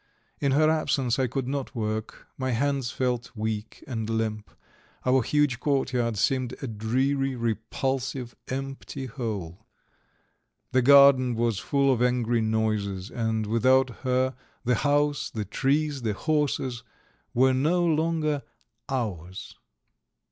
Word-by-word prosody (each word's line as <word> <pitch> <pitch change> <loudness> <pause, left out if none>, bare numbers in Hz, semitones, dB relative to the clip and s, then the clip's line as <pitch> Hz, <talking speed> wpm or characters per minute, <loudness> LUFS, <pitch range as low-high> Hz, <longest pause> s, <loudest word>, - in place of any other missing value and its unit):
In 140 -2 +1
her 155 +2 +4
absence 140 -5 +1
I 130 - +2
could 130 +1 -3
not 135 -1 -3
work, 110 -1 -3
my 130 -1 -2
hands 135 0 0
felt 125 -2 -1
weak 110 0 -4
and 115 -4 -4
limp; 110 -3 -2 0.6
our 130 +1 +4
huge 145 -2 +1
courtyard 125 -6 0
seemed 130 +3 0
a - - -1
dreary, 130 +5 0
repulsive, 125 +2 -2
empty 135 0 -5
hole. 105 - -5 1.0
The 130 - +3
garden 135 -2 +7
was 115 -3 0
full 140 -1 +2
of 120 - -2
angry 120 -2 +2
noises, 110 -3 -1
and 110 -2 -1
without 130 +4 +3
her 130 0 0 0.3
the 125 0 +2
house, 145 +3 +1
the 110 -2 -4
trees, 145 +6 0
the 110 -3 -1
horses 140 -2 -1 0.5
were 130 +2 +4
no 165 +7 +2
longer 155 -2 +1 0.5
"ours." 95 - -4
130 Hz, 125 wpm, -26 LUFS, 110-135 Hz, 1.0 s, garden